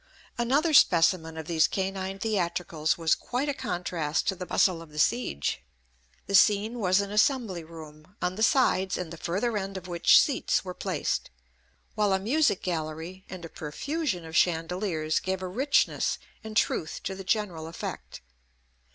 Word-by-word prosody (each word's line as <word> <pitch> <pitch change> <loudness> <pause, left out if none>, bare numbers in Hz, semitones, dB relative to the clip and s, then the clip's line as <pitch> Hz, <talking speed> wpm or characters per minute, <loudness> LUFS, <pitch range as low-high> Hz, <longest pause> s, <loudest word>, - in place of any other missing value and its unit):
Another 280 +7 +1
specimen 165 - +4
of 160 - -5
these 160 -1 +3
canine 190 0 -3
theatricals 175 -7 -1
was 165 -2 +2
quite 255 +4 -2
a 285 - 0
contrast 175 - -2
to 190 - -1
the 180 0 -7
bustle 180 -4 +2
of 165 - -12
the 150 - -13
siege. 120 - 0 0.6
The - - -6
scene 210 +4 +4
was 185 -1 +3
an 200 0 -5
assembly 210 - +1
room, 160 +1 -13
on 180 - -1
the 215 - -6
sides 200 -6 +3
and 175 -2 -5
the - - -8
further 195 +8 -1
end 195 0 -5
of 185 -1 -8
which 175 -1 +5
seats 275 -7 +1
were 180 - -5
placed; - - -2 0.6
while 210 -2 +2
a 190 - +2
music 245 +1 +1
gallery, 165 +2 -4
and 180 -2 -7
a - - -8
profusion 190 - -3
of 160 0 -8
chandeliers, 165 -1 +1
gave 190 0 -3
a - - -2
richness 265 +10 +1 0.3
and 220 0 -5
truth 160 -7 0
to 190 - -3
the 195 0 -8
general 185 -5 -1
effect. 165 - -7
185 Hz, 165 wpm, -27 LUFS, 165-210 Hz, 0.6 s, which